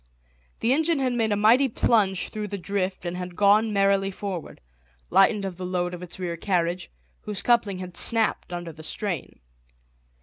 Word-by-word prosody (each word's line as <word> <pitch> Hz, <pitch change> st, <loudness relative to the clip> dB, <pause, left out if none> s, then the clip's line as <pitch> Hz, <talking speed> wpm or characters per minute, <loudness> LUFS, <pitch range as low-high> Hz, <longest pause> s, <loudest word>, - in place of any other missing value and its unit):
The 230 Hz, +3 st, +3 dB
engine 320 Hz, +2 st, +2 dB
had 260 Hz, -2 st, 0 dB
made 225 Hz, -2 st, 0 dB
a -, -, +3 dB
mighty 230 Hz, +7 st, +5 dB
plunge 205 Hz, -5 st, +1 dB
through 215 Hz, -1 st, -5 dB
the 200 Hz, 0 st, -4 dB
drift 185 Hz, 0 st, -3 dB
and 175 Hz, 0 st, -3 dB
had 180 Hz, -1 st, -6 dB
gone 210 Hz, +3 st, +4 dB
merrily 195 Hz, -1 st, +2 dB
forward, 190 Hz, -3 st, -6 dB, 0.5 s
lightened 200 Hz, +1 st, +4 dB
of 185 Hz, -3 st, -5 dB
the 185 Hz, -, -6 dB
load 180 Hz, -1 st, -1 dB
of 175 Hz, -, -7 dB
its 180 Hz, -1 st, -8 dB
rear 175 Hz, -2 st, -3 dB
carriage, 175 Hz, -1 st, -1 dB, 0.3 s
whose 210 Hz, -2 st, -3 dB
coupling 230 Hz, -5 st, +2 dB
had 180 Hz, -1 st, -8 dB
snapped 225 Hz, -5 st, +1 dB
under 175 Hz, -1 st, -5 dB
the 160 Hz, 0 st, -13 dB
strain. 175 Hz, -, -4 dB
195 Hz, 175 wpm, -25 LUFS, 180-215 Hz, 0.5 s, mighty